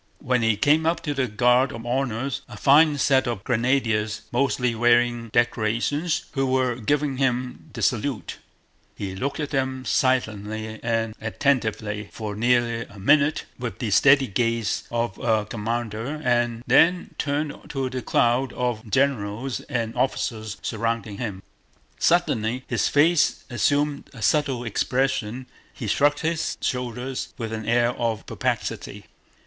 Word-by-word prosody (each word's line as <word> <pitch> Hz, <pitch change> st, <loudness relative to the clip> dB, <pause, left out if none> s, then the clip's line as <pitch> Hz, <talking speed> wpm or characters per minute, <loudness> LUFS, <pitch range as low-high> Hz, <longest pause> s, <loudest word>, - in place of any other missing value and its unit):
When 125 Hz, -1 st, 0 dB
he 115 Hz, -2 st, +2 dB
came 155 Hz, +7 st, +3 dB
up 165 Hz, -, +1 dB
to 150 Hz, -, -1 dB
the 135 Hz, -2 st, 0 dB
guard 125 Hz, +4 st, +3 dB
of 115 Hz, 0 st, -8 dB
honor, 130 Hz, +1 st, -1 dB, 0.2 s
a 110 Hz, -, -9 dB
fine 145 Hz, +5 st, +5 dB
set 135 Hz, -1 st, +3 dB
of 115 Hz, -5 st, -3 dB
Grenadiers 115 Hz, -4 st, 0 dB
mostly 125 Hz, -1 st, +1 dB
wearing 120 Hz, 0 st, +2 dB
decorations, 120 Hz, +8 st, 0 dB
who 135 Hz, -2 st, 0 dB
were 130 Hz, -1 st, +2 dB
giving 135 Hz, +4 st, -1 dB
him 125 Hz, +2 st, -1 dB
the -, -, -5 dB
salute, 120 Hz, -1 st, -1 dB, 0.6 s
he 95 Hz, -2 st, -5 dB
looked 140 Hz, +9 st, -3 dB
at 145 Hz, -2 st, -3 dB
them 130 Hz, -1 st, -1 dB
silently 110 Hz, -4 st, 0 dB
and 115 Hz, -1 st, -1 dB
attentively 110 Hz, -4 st, -1 dB
for 105 Hz, -2 st, -5 dB
nearly 120 Hz, +1 st, +2 dB
a 100 Hz, -, -15 dB
minute 145 Hz, +9 st, +3 dB
with 120 Hz, -1 st, -4 dB
the 115 Hz, -5 st, -3 dB
steady 140 Hz, +5 st, +6 dB
gaze 115 Hz, 0 st, -1 dB
of 120 Hz, -4 st, -2 dB
a 110 Hz, -3 st, +1 dB
commander 115 Hz, +5 st, -3 dB
and 120 Hz, -1 st, +1 dB
then 175 Hz, +2 st, +3 dB
turned 145 Hz, +1 st, -1 dB
to 135 Hz, -2 st, -2 dB
the 130 Hz, -1 st, -3 dB
crowd 120 Hz, +2 st, +2 dB
of 120 Hz, -3 st, -2 dB
generals 130 Hz, 0 st, 0 dB
and 115 Hz, -3 st, -2 dB
officers 110 Hz, -4 st, -2 dB
surrounding 115 Hz, -3 st, -2 dB
him. 100 Hz, -5 st, -4 dB, 0.6 s
Suddenly 125 Hz, -8 st, +1 dB
his 120 Hz, -, +1 dB
face 155 Hz, +2 st, +3 dB
assumed 145 Hz, +4 st, 0 dB
a 115 Hz, -, -7 dB
subtle 140 Hz, -4 st, +1 dB
expression, 125 Hz, 0 st, -1 dB, 0.3 s
he 120 Hz, -, -7 dB
shrugged 145 Hz, +7 st, +2 dB
his 160 Hz, 0 st, -1 dB
shoulders 125 Hz, +1 st, -3 dB
with 115 Hz, -2 st, -4 dB
an 110 Hz, -1 st, -5 dB
air 120 Hz, +1 st, +3 dB
of 115 Hz, -3 st, -2 dB
perplexity. -, -, -3 dB
120 Hz, 140 wpm, -24 LUFS, 110-135 Hz, 0.6 s, steady